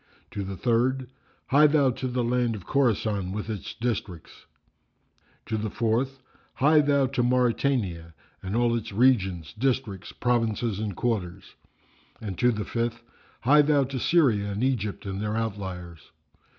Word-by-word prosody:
To 100 - -4
the 95 0 -6
third, 125 +3 +1 0.4
"Hie 150 +3 +6
thou 145 -3 +3
to 130 +2 -4
the 125 -1 -1
land 120 -1 +1
of 100 - -9
Khorasan 110 -7 0
with 105 +2 -4
its 105 - -6
districts." 105 -8 -5 1.0
To 110 - -2
the 110 0 -2
fourth, 125 +5 -1 0.3
"Hie 150 +3 +5
thou 140 -2 +3
to 130 -1 -1
Mauritania 120 - 0 0.3
and 95 +3 -4
all 120 0 +2
its 115 -1 -4
regions, 95 - +2
districts, 120 -5 -2
provinces 115 -3 0
and 105 -3 -3
quarters." 95 -6 -3 0.7
And 100 -4 -5
to 125 - +4
the 105 -3 -3
fifth, 120 0 -3 0.4
"Hie 150 +4 +6
thou 145 -1 +3
to 135 0 -4
Syria 115 -11 +2
and 100 +4 -3
Egypt 115 -8 -1
and 95 0 -4
their 105 +1 -2
outliers." 95 -6 -5
115 Hz, 150 wpm, -26 LUFS, 100-130 Hz, 1.0 s, Hie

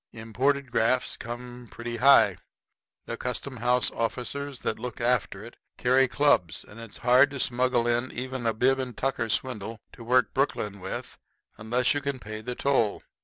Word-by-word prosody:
Imported 125 +4 -1
grafts 125 +2 +1
come 120 +1 -8
pretty 120 0 -6
high. 140 +3 +6 0.7
The 115 - -5
custom 125 +2 -4
house 125 +2 +1
officers 130 +4 -3
that 110 - -2
look 125 +1 -6
after 120 -4 0
it 120 - -12 0.2
carry 130 +2 +4
clubs, 125 - +2
and 105 - -13
it's 115 -3 -9
hard 130 +3 +6
to 140 -1 -7
smuggle 125 -1 +1
in 120 +2 0
even 130 -1 -4
a 115 - +2
bib 130 +4 +2
and 130 -2 -5
tucker 130 -4 -1
swindle 110 -1 -1
to 115 - -11
work 125 +2 +2
Brooklyn 105 -7 -1
with - - -6 0.4
unless 120 +4 +1
you 145 - -2
can 140 -1 -2
pay 110 -2 -7
the 125 +2 -5
toll. 125 -7 +1
125 Hz, 170 wpm, -27 LUFS, 115-130 Hz, 0.7 s, high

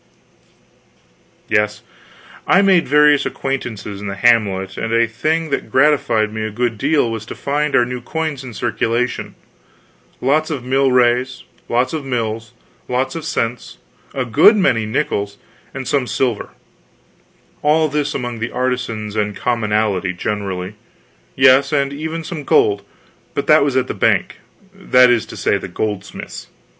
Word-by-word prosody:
Yes, 105 0 0 0.6
I 195 - +5
made 190 -4 +4
various 150 +1 +5
acquaintances 110 -7 -4
in 105 - -5
the 100 - -4
hamlet 100 -4 +2
and 115 - -3
a 115 +1 +3
thing 155 +8 -1
that - - -2
gratified 120 -7 +2
me 110 0 -3
a 110 - -2
good 115 0 -2
deal 145 -3 +2
was 115 -2 -4
to - - -7
find 145 +1 -1
our 120 - +4
new 125 0 -5
coins 155 +1 -3
in 125 -4 -9
circulation 120 +1 -2 0.8
lots 150 +4 +1
of 140 -6 -4
milrays, 125 -1 +2 0.3
lots 125 +4 +1
of 155 -3 -3
mills, 115 -4 -3 0.4
lots 125 +1 -1
of 165 - -5
cents, 115 +1 -3 0.4
a 130 -2 -1
good 120 - +6
many 120 - +2
nickels, 100 -4 -2 0.3
and 135 -2 -6
some 135 -2 0
silver; 115 0 -1 1.1
all 155 +1 +3
this 150 0 -2
among 120 -3 -4
the 115 +1 -2
artisans 120 -4 -3
and 105 -1 -1
commonalty 105 -6 0
generally; 95 -1 -3 0.6
yes, 135 +1 +5
and 140 -2 0
even 160 +3 -4
some 155 -2 -6
gold 415 - +3 0.5
but - - -1
that - - +5
was - - 0
at - - +2
the - - -4
bank, - - +1 0.4
that 125 -10 +4
is 120 -2 +1
to - - -10
say, - - +1
the - - -7
goldsmith's. 105 -3 -5
125 Hz, 150 wpm, -18 LUFS, 110-145 Hz, 1.1 s, good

